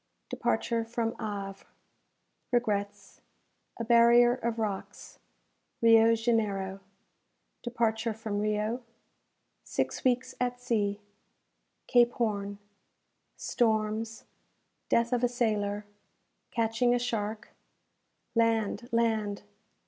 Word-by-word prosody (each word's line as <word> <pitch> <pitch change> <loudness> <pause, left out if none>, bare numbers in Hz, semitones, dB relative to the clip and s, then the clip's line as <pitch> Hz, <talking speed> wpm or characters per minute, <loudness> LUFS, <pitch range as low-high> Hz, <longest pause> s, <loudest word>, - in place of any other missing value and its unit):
Departure 230 -1 0
from 230 0 -2
Havre 200 -2 -5 0.9
Regrets 205 -4 -1 0.6
A - - -1
Barrier 235 +1 +6
of 235 -2 -3
Rocks 210 -4 -5 0.6
Rio 230 0 +6
Janeiro 210 -4 0 0.8
Departure 230 -2 -1
from 215 -2 -3
Rio 215 +3 -1 0.8
Six - - -2
Weeks 255 0 +1
at 245 0 -1
Sea 205 -4 0 0.9
Cape 240 -1 +4
Horn 205 -3 -2 0.8
Storms 220 -1 0 0.7
Death 235 +1 +2
of 245 0 +1
a 245 - +4
Sailor 210 -4 -1 0.6
Catching 230 +1 +1
a - - +3
Shark 220 -2 -3 0.8
Land! 230 0 +1
Land! 220 -3 0
225 Hz, 90 wpm, -29 LUFS, 210-235 Hz, 0.9 s, Barrier